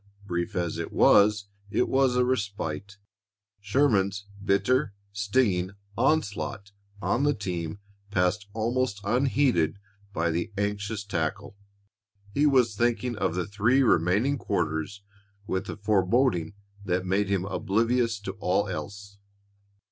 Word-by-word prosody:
Brief 85 -2 -3
as 85 -2 -2
it 85 - -4
was, 105 0 +5 0.2
it 120 - +1
was 130 -2 +2
a 125 0 +3
respite. 100 -6 -3 0.6
Sherman's 100 -3 +1 0.2
bitter, 100 +4 +1 0.2
stinging 100 -3 +1 0.2
onslaught 105 -6 0 0.3
on 120 - +1
the 145 0 +2
team 90 -4 -4 0.3
passed 100 +2 0
almost 115 -1 -1
unheeded 120 - +2 0.3
by 85 -3 0
the 85 +6 -2
anxious 105 +1 -2
tackle. 85 -1 -3 0.8
He 145 +4 +3
was 125 -6 +3
thinking 120 +1 0
of 90 - -1
the 90 - -1
three 110 +7 +2
remaining 110 - +2
quarters 80 +5 -2 0.4
with 95 -1 -3
a - - -5
foreboding 100 -2 +1 0.3
that 90 -1 -1
made 95 +2 +1
him 95 -2 0
oblivious 115 +3 0
to 95 - -4
all 100 +1 +1
else. 100 +2 -7
100 Hz, 120 wpm, -27 LUFS, 95-120 Hz, 0.8 s, was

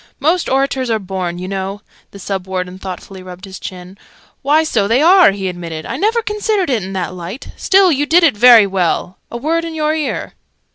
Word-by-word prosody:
"Most 330 +5 +1
orators 265 -1 0
are 225 - +2
born, 185 -3 -4
you 180 +1 -6
know." 195 +1 -5 0.3
The - - -13
Sub 195 -1 -5
Warden 185 0 -4
thoughtfully 190 0 -8
rubbed 185 +1 -10
his 190 -1 -10
chin. 185 +1 -9 0.4
"Why, 300 +3 +3
so 220 -10 0
they 230 +4 +2
are!" 360 +3 +6
he 195 -1 -3
admitted. 170 -3 -6
"I - - -4
never 450 +3 0
considered 420 -5 -1
it 235 -4 +1
in 190 +1 -6
that 185 -1 -3
light. 180 +7 -8
Still, 380 -1 +4
you 290 0 0
did 345 +3 +4
it 310 -9 +4
very 235 -1 +7
well. 185 -1 -1
A 235 - -6
word 325 +6 -1
in 330 -1 -6
your 305 0 0
ear!" 310 -2 -3
205 Hz, 205 wpm, -16 LUFS, 185-310 Hz, 0.4 s, very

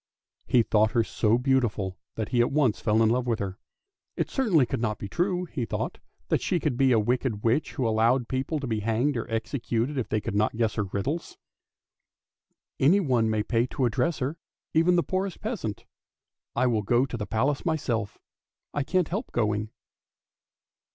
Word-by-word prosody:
He 120 - +4
thought 110 0 +2
her 115 -2 +3
so 110 +1 +1
beautiful 120 -7 0 0.2
that 110 -2 -3
he 120 - +3
at 120 - +1
once 135 -7 +2
fell 110 0 +3
in 110 - +4
love 125 +2 +1
with 115 -2 +1
her. 100 0 -5 0.6
It - - -1
certainly 200 - +3
could 115 - -3
not 110 -3 -1
be 100 - -6
true, 180 - 0
he 155 -7 -4
thought, 110 - -3 0.3
that - - +2
she 175 - 0
could 150 -5 0
be 130 +1 +3
a 120 - +5
wicked 120 -1 -1
witch 120 +7 +1
who 125 - 0
allowed 115 +3 +2
people 135 +4 -2
to 140 - -4
be 110 -3 -1
hanged 115 +7 +1
or 115 - -3
executed 120 +3 -1
if 120 - -3
they 110 - +1
could 100 - -4
not 105 +2 +1
guess 115 -2 +1
her 105 - -1
riddles. 130 - -3 0.7
" - - -57
Anyone 135 - +3
may 110 -1 +1
pay 115 +2 +1
his - - -11
addresses 150 +8 +1
to 130 - -1
her, 150 +5 -4 0.4
even 165 +3 +4
the 175 - +3
poorest 190 0 -2
peasant: 205 - -4 0.7
I - - +2
will 115 -4 +2
go 120 +5 +2
to 130 - -6
the 105 -3 -4
Palace 135 +7 0
myself! 120 - -1 0.6
I 145 - 0
can't 180 +4 +1
help 205 +9 -3
going! 105 -2 0
120 Hz, 190 wpm, -27 LUFS, 110-145 Hz, 0.7 s, a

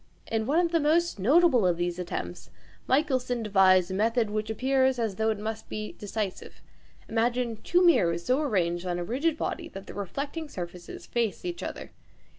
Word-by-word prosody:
In 220 0 -2
one 295 +4 +2
of 335 - -2
the 335 - +3
most 320 -2 +2
notable 270 - +4
of 175 -2 +2
these 175 0 -2
attempts 90 - -5 0.4
Michelson 255 -4 +1
devised 190 -3 +4
a - - -2
method 225 +2 +1
which 215 0 -2
appears 260 +2 +2
as 225 -5 -2
though 220 0 +1
it 220 - 0
must 220 +1 -5
be 215 0 -4
decisive. 205 -2 -5 0.5
Imagine 235 0 0
two 355 +10 +2
mirrors 170 - +3
so 255 +4 +2
arranged 180 - 0
on 175 -1 -1
a 175 - -2
rigid 285 - 0
body - - -3
that 195 0 -9
the - - -9
reflecting 280 - -5
surfaces 175 -5 -8
face 235 - -2
each 350 -1 -4
other. - - -6
220 Hz, 180 wpm, -27 LUFS, 190-270 Hz, 0.5 s, notable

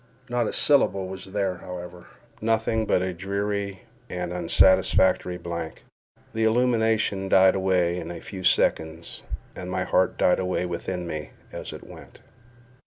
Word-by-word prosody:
Not 120 -2 0
a - - -2
syllable 100 -10 +3
was 95 0 -7
there, 95 -2 -2
however—nothing 110 +6 -3
but 90 - +2
a 95 -1 -2
dreary 100 +1 -3 0.3
and 90 -1 -4
unsatisfactory 90 0 +3
blank; 85 -2 -6 0.5
the 110 - 0
illumination 110 -4 +2
died 95 0 +6
away 90 -2 +1
in 85 -1 -6
a 85 - -6
few 95 -2 -8
seconds, 80 -1 +1 0.3
and 90 0 -6
my 90 0 -1
heart 90 0 +1
died 90 - +3
away 90 -1 -1
within 90 +1 -4
me 75 -3 -5 0.2
as - - -6
it - - -10
went. - - -13
95 Hz, 140 wpm, -25 LUFS, 90-100 Hz, 0.5 s, died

